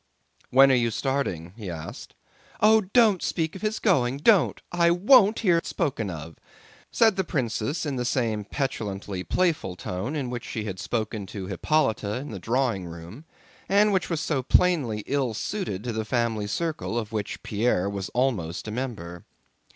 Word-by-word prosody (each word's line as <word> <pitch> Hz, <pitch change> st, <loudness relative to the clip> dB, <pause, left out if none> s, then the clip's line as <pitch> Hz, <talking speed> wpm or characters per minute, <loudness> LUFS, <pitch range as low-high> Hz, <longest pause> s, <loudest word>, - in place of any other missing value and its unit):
"When 135 Hz, +1 st, +6 dB
are -, -, +5 dB
you 120 Hz, -2 st, +3 dB
starting?" 110 Hz, -, -2 dB
he 105 Hz, -5 st, -7 dB
asked. 80 Hz, -2 st, -8 dB, 0.4 s
"Oh, 220 Hz, +1 st, +6 dB
don't 205 Hz, -1 st, +3 dB
speak 160 Hz, 0 st, -1 dB
of 190 Hz, -, -8 dB
his 215 Hz, 0 st, -1 dB
going, 135 Hz, -, +2 dB
don't! 185 Hz, +4 st, +4 dB
I 170 Hz, -1 st, +3 dB
won't 210 Hz, +4 st, +5 dB
hear 180 Hz, -6 st, +4 dB
it 165 Hz, -, -3 dB
spoken 135 Hz, -, -2 dB
of," 80 Hz, -1 st, -8 dB, 0.5 s
said 220 Hz, -4 st, +4 dB
the 190 Hz, -, +2 dB
princess 135 Hz, -1 st, -2 dB
in 140 Hz, -3 st, -2 dB
the 125 Hz, -, -1 dB
same 115 Hz, -4 st, 0 dB
petulantly 100 Hz, -6 st, -3 dB
playful 160 Hz, -, 0 dB
tone 95 Hz, +11 st, -4 dB
in 135 Hz, -5 st, -3 dB
which 120 Hz, -2 st, -4 dB
she 110 Hz, -, -4 dB
had 95 Hz, -3 st, -5 dB
spoken 110 Hz, -3 st, -3 dB
to 95 Hz, -1 st, -6 dB
Hippolyte 110 Hz, -, 0 dB
in 115 Hz, +8 st, -4 dB
the 100 Hz, -, -6 dB
drawing 115 Hz, -4 st, 0 dB
room 85 Hz, -, -10 dB, 0.4 s
and 205 Hz, +1 st, +4 dB
which 185 Hz, -2 st, 0 dB
was 165 Hz, -3 st, -1 dB
so 145 Hz, -4 st, 0 dB
plainly 130 Hz, -, +2 dB
ill 135 Hz, -5 st, -1 dB
suited 110 Hz, -, -3 dB
to 120 Hz, -1 st, -3 dB
the 110 Hz, 0 st, -2 dB
family 115 Hz, -2 st, -1 dB
circle 155 Hz, -2 st, -2 dB
of 110 Hz, -2 st, -3 dB
which 105 Hz, -1 st, -4 dB
Pierre 105 Hz, -3 st, +1 dB
was 100 Hz, -1 st, -4 dB
almost 110 Hz, -10 st, -1 dB
a -, -, -4 dB
member. 105 Hz, -9 st, -5 dB
125 Hz, 175 wpm, -26 LUFS, 105-165 Hz, 0.5 s, When